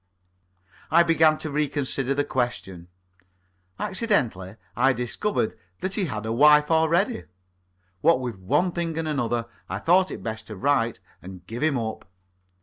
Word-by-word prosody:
I 170 +2 +6
began 160 -2 +4
to 155 - -5
re 150 +1 +1
consider 135 -1 0
the 145 - +1
question. 120 -10 -3 0.9
Accidentally, 160 - -1 0.2
I 130 +2 +3
discovered 125 - -2 0.3
that 190 +1 -2
he 200 -2 0
had 110 -8 -4
a 110 - -2
wife 150 +4 +5
already. 160 - +2 0.8
What 165 -6 +4
with 120 -6 -5
one 145 - +1
thing 170 -2 -3
and 165 -1 -2
another, 120 -6 -1 0.2
I - - -3
thought 185 +2 +3
it - - -7
best 110 -1 -5
to 110 - -7
write 115 0 +1 0.2
and 90 0 -11
give 115 +3 -7
him 155 -3 +2
up. 110 -5 -5
140 Hz, 150 wpm, -25 LUFS, 115-165 Hz, 0.9 s, I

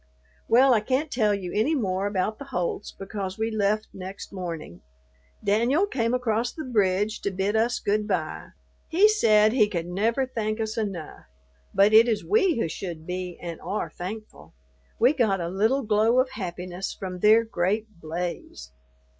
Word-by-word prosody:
Well, 260 +2 +6
I 225 - +4
can't 265 +8 -1
tell 215 -4 +2
you 185 -3 -6
any 260 +10 +2
more 195 -6 -1
about 205 +2 -1
the 280 - -7
Holts 180 -4 -3
because 195 -1 -6
we 220 +1 -1
left 215 0 +1
next 190 +1 -8
morning. 165 - -6 0.6
Danyul 235 - +3
came 230 -3 0
across 240 -1 0
the 315 - -7
bridge 210 -3 0
to - - -1
bid 195 +2 -1
us 230 +2 +2
good 210 +1 0
bye. 170 -6 -2 0.4
He 370 +6 +5
said 220 - +4
he 220 -5 +4
could 170 -4 -3
never 220 +9 0
thank 215 -3 -3
us 220 -1 -2
enough, 195 -8 -5 0.5
but 200 +2 +4
it 225 +2 +8
is 225 -3 -1
we 385 - +3
who 225 - 0
should 165 -1 -6
be 180 0 -5
and 170 -2 -7
are 195 +4 -3
thankful. 185 - -8 0.4
We 250 +5 +5
got 220 -9 +1
a 170 -1 -3
little 220 +9 +1
glow 220 +3 +3
of 255 0 +1
happiness 180 -3 -5
from 185 -2 -5
their 215 +4 +6
great 210 0 -2
blaze. 160 - -5
210 Hz, 170 wpm, -25 LUFS, 185-230 Hz, 0.6 s, it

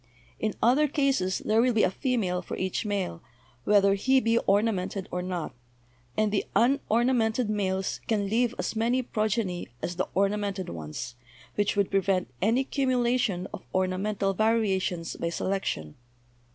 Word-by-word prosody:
In 215 -2 -1
other 265 +6 +5
cases' 270 - 0
there 220 +1 +4
will 250 0 +3
be 220 - +3
a 185 - +3
female 200 -7 -1
for - - -6
each 190 +3 -2
male, 195 - -2 0.4
whether 200 -1 +5
he 260 +7 +3
be 230 -1 +2
ornamented 195 -2 +1
or 180 - -2
not; 180 -2 -4 0.6
and 215 -1 +2
the 205 - +1
unornamented 235 -2 +2
males 190 -2 -1
can 205 -3 +1
leave 235 +3 +1
as - - -3
many 240 +3 +1
progeny 215 -5 -1
as 175 +6 -4
the 185 - 0
ornamented 200 -1 0
ones, 80 +10 -6 0.4
which 205 0 0
would 200 -1 +1
prevent 190 -6 +1
any 230 +7 +3
cumulation 245 -8 0
of - - -6
ornamental 195 +2 0
variations 195 -5 0
by 170 - -2
se 170 - -3
lection. 185 - -2
205 Hz, 150 wpm, -27 LUFS, 185-230 Hz, 0.6 s, other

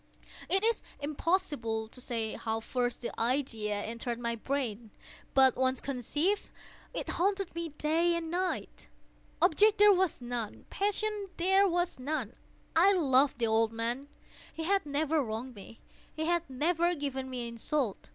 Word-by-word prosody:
It 385 +2 +3
is 460 +1 +2 0.2
impossible 290 - -1
to 250 +3 -10
say 230 -3 -2
how 225 -1 -2
first 245 +1 -2
the 235 - -3
idea 230 -4 0
entered 230 +1 -3
my 235 -1 -1
brain; 235 -3 -3 0.5
but 265 -1 +6
once 260 0 +1
conceived, 290 - -1 0.4
it - - -4
haunted 390 +1 0
me 335 -1 -4
day 320 +3 +1
and 330 -1 -3
night. 365 +1 -2 0.6
Object 420 +6 +5
there 415 0 +8
was 375 -3 +1
none. 240 -3 -5
Passion 415 0 -1
there 385 +3 +4
was 350 -4 0
none. 255 -4 -3 0.4
I 375 +5 +6
loved 275 -6 +4
the 235 - +1
old 225 0 +2
man. 235 +5 -2 0.4
He 325 - -5
had 390 -1 +1
never 300 +2 +1
wronged 235 +3 -5
me. 210 +1 -12 0.3
He 315 - -2
had 340 -1 0
never 340 +6 +1
given 270 -3 -3
me 245 -2 -4
insult. 235 0 -2
280 Hz, 150 wpm, -31 LUFS, 235-345 Hz, 0.6 s, there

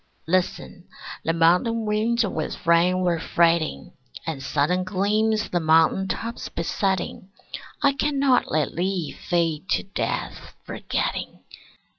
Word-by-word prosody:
Listen: 180 0 -1 0.4
the 165 - +1
mountain 180 +8 +2
winds 220 +2 +1
with 160 -6 -4
rain 175 +2 +4
were 175 -2 +1
fretting, 165 -1 +1 0.3
And 160 -5 -4
sudden 150 +7 0
gleams 210 +3 0
the 175 - 0
mountain 160 +4 +3
tops 230 +4 -4
besetting. 190 +2 -2 0.5
I 280 -1 +5
cannot 280 -2 +2
let 155 -1 0
thee 180 -2 -1
fade 170 0 -1
to - - +1
death, 195 - -4
forgetting. - - -3
180 Hz, 115 wpm, -24 LUFS, 165-210 Hz, 0.5 s, I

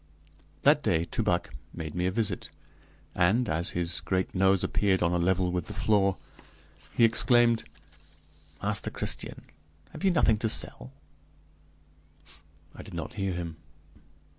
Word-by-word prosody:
That - - +5
day 80 +1 +1
Toubac 90 -1 -1 0.2
made 80 -2 -6
me 90 +1 -1
a - - 0
visit, 110 +1 -2 0.6
and, 100 +8 +2
as 80 +2 +1
his 85 -2 +2
great 90 +4 -2
nose 95 0 +2
appeared 95 -3 +1
on 85 0 +1
a 90 - +1
level 90 +1 +1
with 90 -2 -3
the - - -7
floor, 100 -3 +2 0.8
he 115 - +6
exclaimed: 115 0 +3 1.0
"Master - - 0
Christian, - - -2 0.5
have - - -10
you 195 - +4
nothing 115 - +3
to 110 - 0
sell?" - - +1 1.8
I - - -10
did 100 -4 -11
not 85 -2 -5
hear 95 -2 -2
him. 85 -2 -6
95 Hz, 140 wpm, -28 LUFS, 85-110 Hz, 1.8 s, he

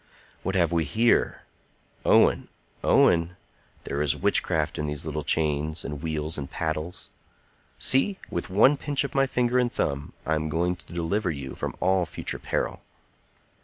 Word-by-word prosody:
"What 95 +1 -2
have 85 -3 +3
we 85 -1 +2
here? 115 +11 +2 0.6
Owen! - - +4 0.4
Owen! 85 +1 +3 0.5
there 70 - -3
is 75 -4 +2
witchcraft - - +1
in 75 - -2
these 75 0 -4
little 75 -1 -3
chains, 75 0 0
and 70 0 -5
wheels, 80 -1 -2
and 70 - -6
paddles. 80 +2 -4 0.7
See! 160 +9 +3
with 85 - -3
one 115 +10 +5
pinch 145 0 -1
of 140 - -5
my 135 0 +3
finger 125 0 +1
and 120 -1 +1
thumb 70 - -2
I 80 - +1
am 80 0 -1
going 85 +3 0
to 85 - -17
deliver 85 +4 -1
you 70 -4 -5
from - - -4
all 95 -1 +2
future - - -4
peril." - - -2
85 Hz, 160 wpm, -26 LUFS, 75-100 Hz, 0.7 s, one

